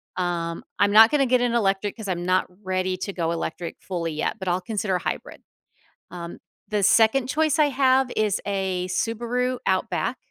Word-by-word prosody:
Um, 170 -2 -2
I'm 205 0 +3
not 220 +2 +8
gonna 285 -2 +2
get 250 -1 +2
an 245 -1 +1
electric 200 -2 0
'cause 220 -3 -7
I'm 175 -2 -2
not 185 +1 +2 0.2
ready 185 0 -1
to 195 +2 -5
go 170 -2 -1
electric 170 0 -4
fully 170 -4 -3
yet, 155 +8 -2
but 190 - -7
I'll 180 +1 +1
consider 200 0 -2
a 180 - 0
hybrid. - - -5 0.7
Um, 170 -1 -8 0.3
the 210 -1 -1
second 225 +6 +4
choice 310 +3 +1
I 305 - +5
have 265 -2 +2
is 215 -2 +1
a 190 -2 -2
Subaru 235 +6 -1
Outback 190 +6 0
200 Hz, 180 wpm, -24 LUFS, 180-235 Hz, 0.7 s, not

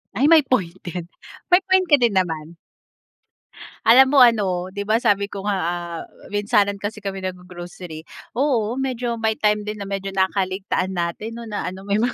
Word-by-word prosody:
Ay 275 - +3
may 320 -1 +7
point 190 -10 0
din. 175 -1 -6 0.4
May 360 +1 +4
point 375 -1 +2
ka 295 - +7
din 240 -5 +2
naman. 165 -3 -2 1.3
Alam 260 +4 +7
mo 275 - +7
ano, 195 -7 +3
'di 200 +1 -5
ba 220 +3 +2
sabi 205 -4 +2
ko 200 -1 -7
nga, 205 0 -1
ah, 170 -1 -3 0.3
minsanan 205 0 +1
kasi 210 +2 -5
kami 195 -1 -4
nag-g-grocery, 180 -3 -8 0.3
oo 245 -4 +1
medyo 250 -3 -2
may 220 -1 +1
time 210 -1 0
din 210 -1 -5
na 195 - -6
medyo 195 0 -4
nakakaligtaan 190 0 -1
natin 175 +6 -3
'no 230 -1 -8
na 210 - -3
ano 185 +1 -6
may 200 +1 -1
mga 240 +3 0
205 Hz, 180 wpm, -22 LUFS, 185-230 Hz, 1.3 s, may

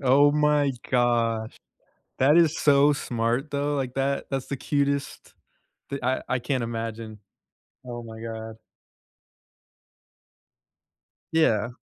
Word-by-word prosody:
Oh 140 +2 +5
my 150 -1 +2 0.2
gosh. 115 -2 +1 0.6
That 140 +4 +5
is 165 -2 +4
so 145 0 +5
smart, 120 +1 -2
though, 145 +1 -1
like, 130 -3 -3
that 135 +1 -1
that's 135 -2 -2
the 140 - -4
cutest 140 0 -2 0.6
the 140 -1 -5
I 130 +1 0
I 130 - +1
can't 130 0 -1
imagine. 115 -1 -5 0.7
Oh 120 -1 -6
my 110 -1 -10
god. 110 -1 -6 2.8
Yeah. 120 -8 +2
130 Hz, 110 wpm, -25 LUFS, 115-140 Hz, 2.8 s, Oh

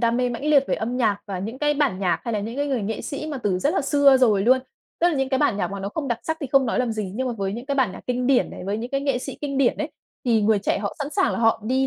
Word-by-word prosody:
đam 235 0 +2
mê 250 0 +1
mãnh 240 +4 -5
liệt 285 -3 +5
về - - +2
âm 240 +3 -3
nhạc 215 -5 +2
và 195 -3 -4
những 220 +8 -5
cái 295 0 +1
bản 280 -10 +1
nhạc 180 -3 0
hay 235 - -2
là 210 - 0
những 230 +5 -5
cái 285 0 0
người 260 -6 -1
nghệ 220 +2 -3
sĩ 290 +2 -5
mà 295 -3 -4
từ 195 -6 0
rất 290 - +1
là - - +2
xưa 280 -1 +5
rồi 215 -6 +3
luôn. 255 +4 +5 0.4
Tức 345 - +5
là 340 - 0
những 270 -1 0
cái 265 - +1
bản 260 -8 +2
nhạc - - -1
mà 200 -1 -5
nó 195 - -3
không 280 +5 -4
đặc 235 -1 -1
sắc 320 0 -2
thì 280 - -3
không 275 -2 +5
nói 230 - 0
làm 245 -3 0
gì, 205 -4 -4
nhưng 260 +4 -2
mà - - -2
với 195 -1 -1
những 240 +5 -6
cái 280 - -1
bản 250 -9 +1
nhạc - - -9
kinh 250 0 -1
điển 265 -1 +3
này, - - -8
với 200 +3 -2
những 240 +3 -5
cái 275 - 0
nghệ 275 -3 0
sĩ 270 +1 -7
kinh 275 -2 -2
điển 260 -3 +3
ấy, 300 0 -3 0.3
thì 225 -3 +3
người 210 0 +3
trẻ 200 - 0
họ 200 -1 -3
sẵn 285 0 -3
sàng 385 +1 +1
là - - -2
họ 225 -2 +2
đi 260 +3 +1
250 Hz, 350 wpm, -23 LUFS, 215-275 Hz, 0.4 s, liệt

